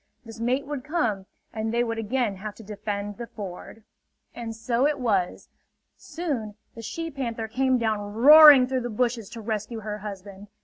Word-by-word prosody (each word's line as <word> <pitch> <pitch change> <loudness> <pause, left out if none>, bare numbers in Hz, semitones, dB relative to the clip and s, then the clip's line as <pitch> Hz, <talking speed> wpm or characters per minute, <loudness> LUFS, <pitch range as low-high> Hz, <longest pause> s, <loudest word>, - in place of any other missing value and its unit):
This 225 0 -11
mate 250 +4 0
would 285 -2 -5
come, 230 - -1 0.3
and 220 0 -3
they 235 +1 +1
would 230 -1 -3
again 225 -2 -1
have 210 +2 -7
to 225 - -13
defend 205 0 -5
the 235 - -6
ford. 205 +1 -9 0.5
And 230 -2 -6
so 235 +4 +1
it 295 -2 -1
was. 200 -8 -1 0.5
Soon 265 -12 -5 0.2
the 230 - -9
she 330 +9 -5
panther 235 -5 -4
came 260 +3 +1
down 220 -3 0 0.2
roaring 290 +1 +9
through 260 0 -2
the 240 - -4
bushes 230 -2 -1
to 230 - -9
rescue 220 +1 -4
her 210 0 -5
husband. 200 0 -9
230 Hz, 175 wpm, -25 LUFS, 210-255 Hz, 0.5 s, roaring